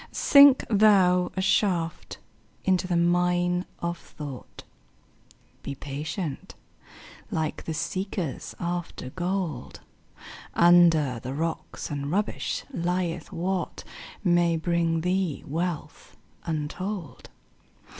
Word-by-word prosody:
Sink 280 -2 +7
thou 195 -4 +4
a - - +1
shaft 180 -4 0 0.5
into 185 -1 +2
the 175 -2 +1
mine 175 +1 +2 0.2
of 170 0 -2
thought; 145 -5 -9 1.0
Be 140 - -5
patient, 145 +4 -5 0.7
like 160 -1 -3
the 160 - -3
seekers 175 -1 -3
after 175 -6 -4
gold; 180 -6 -3 0.7
Under 165 -7 +5
the 130 +3 -6
rocks 165 0 -4
and 140 -1 -3
rubbish 205 +6 -1
lieth 175 -2 -2
what 180 +2 -3 0.4
May 175 -2 +3
bring 165 0 0
thee 180 -3 -1
wealth 165 +1 -4 0.3
untold. 165 - -4
175 Hz, 95 wpm, -26 LUFS, 160-185 Hz, 1.0 s, Sink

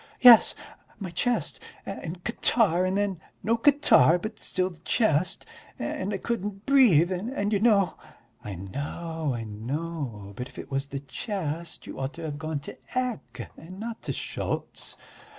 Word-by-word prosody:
"Yes, 245 -3 +9 0.4
my 190 -4 -5
chest 240 +8 0 0.3
and 175 +1 -6
catarrh 210 -6 +3
and 190 +1 0
then 200 -5 -1 0.2
no 225 +2 +3
catarrh, 235 - +6
but 215 +4 -6
still 185 0 -1
the 165 - -14
chest, 175 - +1 0.3
and 190 +2 -3
I 200 - -1
couldn't 205 -2 -3
breathe... 215 - +6
and 205 +2 -1
you 200 - +3
know...." 200 -6 +3 0.4
"I 100 -2 -5
know, 145 - -4
I 115 - -4
know. 115 -1 -5
But 125 +3 -5
if - - -17
it - - -8
was 135 +1 -1
the 140 -1 -5
chest 170 - -4
you - - -8
ought 135 +2 -3
to 170 - -8
have 145 -2 -4
gone 155 -1 -2
to - - -7 0.2
Ecke 250 -3 -3
and 185 +4 -11
not 230 +1 -5
to - - -3
Schultz." - - -4
175 Hz, 160 wpm, -27 LUFS, 145-215 Hz, 0.4 s, Yes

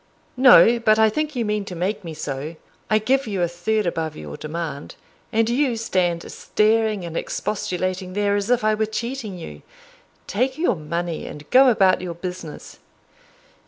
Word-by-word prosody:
"No; 245 -2 +7
but 215 -2 +4
I 220 -1 +4
think 305 +4 -2
you 235 -2 -1
mean 210 -1 -1
to 180 - -7
make 195 +5 -2
me 165 -2 -7
so 150 +1 -5 0.3
I 215 - +4
give 260 +4 +1
you 195 -4 -1
a - - +2
third 195 +5 -1
above 165 -2 -2
your 75 -1 -8
demand, 155 - -6 0.4
and 225 -1 +2
you 250 +1 +1
stand 180 -6 -1
staring 215 -2 +1
and 165 -1 -7
expostulating 185 -1 -3
there 205 0 +1
as 205 +2 -2
if 245 -3 +2
I 215 0 +3
were 215 0 0
cheating 230 -2 -4
you. 75 - -9 0.6
Take 255 +6 -1
your 325 - +1
money, 170 +1 -4
and 150 0 -10
go 265 +1 +7
about 190 -6 +3
your 175 -2 -5
business." 180 -3 -8
200 Hz, 170 wpm, -22 LUFS, 170-225 Hz, 0.6 s, No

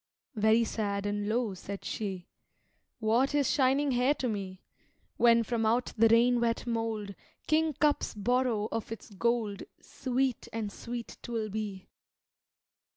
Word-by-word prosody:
Very 220 +1 +4
sad 205 -3 -2
and 205 0 -1
low 230 -2 0
said 195 +2 -7
she, 190 -4 -4 0.7
"What 235 +5 +2
is 285 -3 +2
shining 275 +1 +3
hair 255 +4 +3
to 255 - -2
me? 195 -4 -4 0.5
When 235 -1 +5
from 230 0 -1
out 235 +3 +1
the 225 +1 +5
rain 235 +2 +4
wet 230 0 0
mold 225 -3 -2 0.3
Kingcups 305 -4 +1
borrow 235 0 +1
of 225 -1 -3
its 225 -1 -8
gold 220 0 0 0.2
Sweet 260 -1 -2
and 220 -2 -3
sweet 235 +2 -7
'twill 225 -2 -3
be." 205 -2 -5
230 Hz, 135 wpm, -30 LUFS, 210-245 Hz, 0.7 s, When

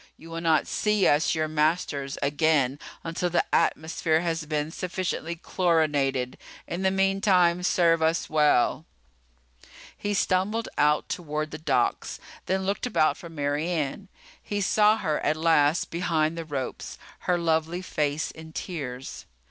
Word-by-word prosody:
You 165 - -13
will 165 0 -4
not 160 -2 +3
see 210 -2 +1
us, 150 +3 +3
your 155 -1 0
masters, 150 -3 0
again 145 -1 +2 0.2
until 170 +2 -2
the 175 - +1
atmosphere 160 0 +1
has 165 -2 -2
been 150 0 -2
sufficiently 180 -2 -3
chlorinated. 150 -8 0 0.3
In 175 - -4
the 190 - +3
meantime, 195 -2 +3
serve 170 -3 +3
us 160 +1 +1
well." 150 -5 +2 1.1
He 205 0 -2
stumbled 200 +5 0
out 150 +1 +2
toward 155 -2 -3
the 150 - -6
docks, 135 -6 0 0.3
then 190 0 0
looked 200 +5 -1
about 155 -10 +2
for 170 - -10
Mary 145 +1 -2
Ann. 170 +3 -2 0.3
He 205 - -3
saw 210 +2 +4
her 155 -7 -1
at 155 - 0
last 160 -1 +2
behind 165 -2 0
the 165 -1 -5
ropes, 140 -4 -5 0.3
her 180 - +4
lovely 165 +1 0
face 150 -3 -1
in 160 0 -12
tears. 135 -9 -6
160 Hz, 140 wpm, -26 LUFS, 150-180 Hz, 1.1 s, saw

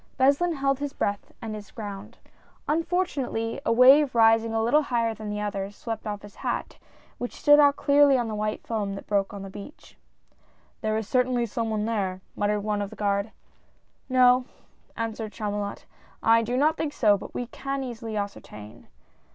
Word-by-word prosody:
Beslin 280 +6 +3
held 275 -1 0
his 285 -1 -4
breath 200 -6 -3
and 220 -1 -4
his 210 -2 -8
ground. 205 -3 -8 0.5
Unfortu 335 +2 0
nately, 230 -1 -2
a - - +1
wave 260 +3 +6
rising 225 0 +4
a 225 0 0
little 255 +7 +4
higher 235 -5 0
than 215 -1 -7
the 210 0 -3
others, 200 -1 -4
swept 225 -1 -5
off 205 -1 -4
his 205 - -13
hat, - - -4 0.4
which 245 - -5
stood 290 0 +6
out 285 -1 +6
clearly 285 -1 +4
on 240 -2 -1
the 220 - -4
white 215 0 -3
foam 205 -3 -2
that 195 - -9
broke 200 -1 0
on 200 -1 -7
the 195 - -7
beach. 205 +10 -11 0.4
" - - -37
There 215 -1 0
is 220 -2 -3
certainly 250 -1 +1
some 230 +1 -3
one 215 -1 -1
there," 195 -5 -2
muttered 205 0 0
one 210 -1 -1
of 200 - -3
the - - -11
guard. 200 +1 -1 0.8
"No," 250 0 +5 0.5
answered 225 -1 -4
Chamulot, 205 -2 -4 0.4
"I 230 0 +5
do 240 +2 -2
not 310 +4 +3
think 295 -2 -2
so, 210 -3 +4
but 200 - -9
we 245 - -2
can 275 +3 -4
easily 230 -3 -5
ascertain." 110 - -7
225 Hz, 185 wpm, -26 LUFS, 205-260 Hz, 0.8 s, wave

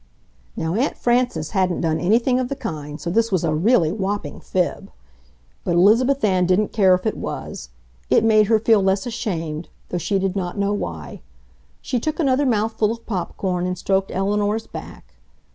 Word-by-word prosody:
Now 160 +1 -1
Aunt 250 +9 0
Frances 245 +1 0
hadn't 185 -4 0
done 160 -1 0
anything 235 +7 +2
of 250 -1 -2
the 275 - -2
kind, 155 - -6
so 170 - -4
this 230 +3 +1
was 185 -3 +1
a 160 -2 +1
really 170 0 +3
whopping 205 +1 -3
fib. 180 -2 -2 0.7
But 175 - 0
Elizabeth 230 +9 +4
Ann 185 -4 +3
didn't 190 +3 +1
care 190 -4 +5
if 180 - -6
it 220 - 0
was. - - -6 0.4
It - - +4
made 215 -2 +4
her 220 0 +4
feel 220 -1 +3
less 195 +3 +1
ashamed, 165 -9 -4 0.2
though 180 - -2
she 195 +5 0
did 190 0 -1
not 180 0 -3
know 200 0 +1
why. 80 - -5 0.6
She 245 - -1
took 310 +7 -3
another 275 -2 +2
mouthful 220 -2 +1
of 230 0 -7
pop 185 -6 -4
corn 180 -2 -1
and 180 0 -3
stroked 195 +1 0
Eleanor's 205 +3 0
back. - - -10
200 Hz, 180 wpm, -21 LUFS, 180-225 Hz, 0.7 s, care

